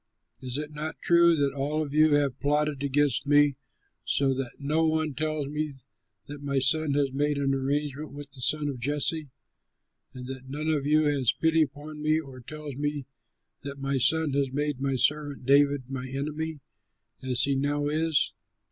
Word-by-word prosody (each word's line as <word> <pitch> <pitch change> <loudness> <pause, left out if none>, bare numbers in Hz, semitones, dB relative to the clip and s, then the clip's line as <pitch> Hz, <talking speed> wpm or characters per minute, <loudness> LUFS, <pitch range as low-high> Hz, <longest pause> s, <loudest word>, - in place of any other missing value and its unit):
Is 130 0 -4
it 150 0 -5
not 155 +1 -5
true 170 0 +5
that 140 -2 +1
all 145 +3 -1
of 145 -2 -7
you 155 0 +5
have 140 -3 0
plotted 150 -1 0
against 140 -1 +1
me 145 -1 +5 0.5
so 135 -1 +2
that 130 -2 -4
no 155 +3 +1
one 155 -1 0
tells 155 +1 -2
me 150 0 -3 0.5
that 145 0 -9
my 140 -1 -2
son 140 +2 +3
has 140 -2 +1
made 145 +1 0
an 140 -1 +1
agreement 145 +2 -2
with 145 0 -9
the 135 -2 -12
son 150 +3 +2
of 135 -4 -4
Jesse, 145 +3 -1 0.9
and 125 -1 -7
that 130 0 -8
none 150 +3 -3
of 145 -3 0
you 155 +1 +4
has 140 -5 +2
pity 160 0 +2
upon 150 +1 -4
me 155 +1 +2
or 135 -5 -9
tells 145 +2 -8
me 145 -1 -2 0.6
that 140 0 -7
my 135 -1 -1
son 155 +3 +3
has 140 -1 0
made 145 -1 -2
my 135 -1 0
servant 145 0 +1
David 140 -1 +3
my 130 -1 -4
enemy 150 +3 -4 0.6
as 130 -2 0
he 140 - +1
now 145 +2 0
is?" 155 +1 +1
145 Hz, 180 wpm, -27 LUFS, 135-150 Hz, 0.9 s, true